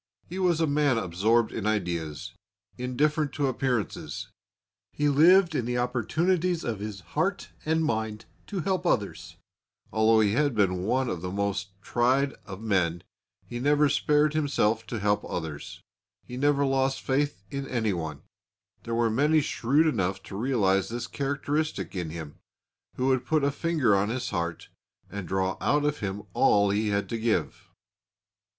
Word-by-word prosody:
He 185 +3 -6
was 175 -3 +2
a 165 - +3
man 145 -4 +2
absorbed 110 +4 +2
in 105 - -3
ideas, 85 -8 -2 0.4
indifferent 145 +4 0
to 145 - 0
appearances. 125 -5 -2 0.6
He 150 0 +1
lived 170 +5 +6
in 125 -6 -1
the 125 +1 -1
opportunities 165 - 0
of 110 -4 -3
his 105 -1 -6
heart - - -1 0.2
and 160 +1 +1
mind 110 -3 -2 0.2
to 195 -4 -3
help 185 0 -1
others; 85 - -1 0.6
although 110 0 +4
he 105 -2 +3
had 145 +2 +1
been 90 -3 +1
one 130 +4 +1
of 90 -7 -3
the 90 - -4
most 100 0 -2
tried 130 +3 +2
of 95 -2 -7
men, 90 -6 0 0.4
he 120 - -6
had 120 - -4
never 145 +1 +4
spared 150 +2 +2
himself 115 -7 +1
to 120 - -4
help 105 0 +1
others. 90 +3 -6 0.4
He 125 - -8
never 140 +1 +2
lost 135 0 +1
faith 140 -5 -1
in 140 -1 -4
anyone. 85 - -2 0.6
There 115 -1 -3
were 115 -1 +2
many 150 +7 +3
shrewd 140 +2 +2
enough 95 - 0
to - - -9
realise 100 -5 +1
this 120 0 -4
characteristic 140 - -2
in 90 -3 -3
him, 80 -2 -8 0.6
who 130 - -1
would 130 -1 +2
put 155 -2 +2
a 140 - +2
finger 145 -8 +2
on 100 +2 +1
his 125 +2 -3
heart 85 0 -3 0.4
and 100 -2 -5
draw 95 +1 0
out 145 0 +2
of 150 0 0
him 100 0 -4
all 100 -1 +4
he 105 +2 0
had 100 0 0
to 115 - -2
give. 115 0 -1
120 Hz, 160 wpm, -27 LUFS, 100-145 Hz, 0.6 s, lived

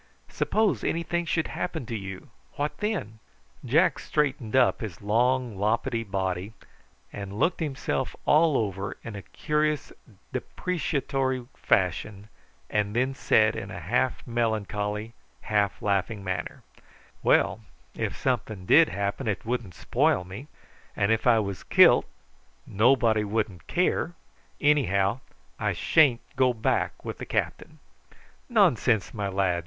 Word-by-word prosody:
Suppose 205 - +1
anything 170 +1 -1
should 160 0 -1
happen 170 -6 -4
to 115 - -5
you, 95 -3 -7 0.2
what 145 +1 -2
then?" 175 - -3 0.4
Jack 160 +6 +3
straightened 135 -6 -1
up 130 0 +4
his 100 -8 -6
long 120 +2 +1
loppetty 115 +3 0
body, 95 -1 -3 0.6
and 100 0 -6
looked 165 - +1
himself 135 -4 -2
all 155 -2 +4
over 95 -2 -3
in 115 -2 -7
a 100 - -6
curious 150 +6 -1 0.4
depreciatory 135 -7 -2
fashion, 100 +3 0 0.4
and 105 - -1
then 130 +3 +1
said 110 -4 +3
in 100 - -5
a 100 - -6
half 120 +9 -1
melancholy, 110 -2 -2 0.3
half 100 -4 0
laughing 100 +1 0
manner: 95 -1 -4 0.6
"Well, - - +3 0.3
if - - -3
something 110 -7 -2
did 165 - +6
happen, 100 +6 -3
it 100 -3 -2
wouldn't 115 -7 -3
spoil 90 - +1
me; 100 +10 -9 0.5
and 100 +1 +1
if 110 +2 +1
I 120 -2 +6
was 100 -3 -2
killed - - +6 0.6
nobody 115 0 +3
wouldn't 105 -3 -3
care. 175 -1 0 0.4
Anyhow 115 -7 +2 0.4
I - - 0
sha'n't 140 -7 +3
go 130 -2 +3
back 110 - -1
with - - -5
the - - -5
captain." - - -3 0.7
"Nonsense, 115 -4 +3
my 105 -3 -2
lad!" 95 -3 +1
115 Hz, 125 wpm, -26 LUFS, 100-135 Hz, 0.7 s, did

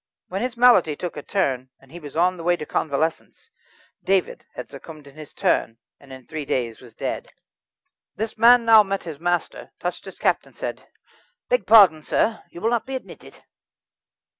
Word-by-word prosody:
When 190 +2 -3
his 245 -1 -3
malady 235 -11 +5
took 175 +3 -6
a 145 - -6
turn, 135 -9 -1
and 135 - -22
he 175 - -9
was 145 -3 -11
on 180 +3 +2
the 170 - -9
way 175 +1 +2
to 150 - -6
convalescence, 160 - -3 0.5
David 195 -2 0
had - - -7
succumbed 155 -3 -12
in 140 - -15
his 155 -2 -12
turn, 115 - 0 0.2
and 140 -1 -17
in 130 -1 -11
three 155 -2 -6
days 120 -5 -2
was 120 -3 -16
dead. - - -5 0.8
This 220 +1 -4
man 235 +1 +6
now 225 -1 +8
met 195 -1 -3
his 160 -4 -8
master, 175 +1 -2
touched - - -4
his - - -10
cap, - - +1
and - - -20
said: - - -6 0.6
"Beg - - +1
pardon, 195 -9 +7
sir, 220 +8 0
you 170 - -11
will 225 - +1
not 240 +1 -1
be 270 - -4
admitted." 260 - -10
175 Hz, 190 wpm, -23 LUFS, 145-220 Hz, 0.8 s, now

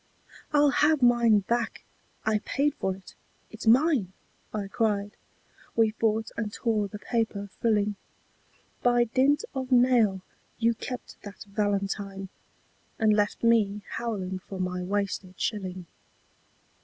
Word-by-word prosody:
" - - -19
I'll 295 -1 +5
have 295 -1 +3
mine 235 -3 +5
back 235 +3 -2 0.4
I 215 -1 +2
paid 285 +6 0
for 190 -7 -2
it 190 -1 -14 0.4
it's 225 0 -8
mine! 245 - +4 0.2
" - - -38
I 205 -2 -3
cried. 205 -1 -1 0.6
We 225 -1 +4
fought 220 0 0
and 215 -2 -3
tore 215 -3 0
the 210 - -8
paper 210 -2 -2
frilling. 210 -2 +2 0.9
By 240 0 +4
dint 265 +5 +2
of 265 -1 -4
nail 240 -7 +4 0.3
you 230 0 +2
kept 250 +2 -7
that 205 -1 -10
valentine, 200 -1 -2 0.7
And 220 -1 +4
left 210 +1 0
me 210 -3 +3
howling 190 -6 -3
for 190 +1 -9
my 180 0 -2
wasted 190 -1 -3
shilling. 185 -4 -3
215 Hz, 130 wpm, -27 LUFS, 200-235 Hz, 0.9 s, I'll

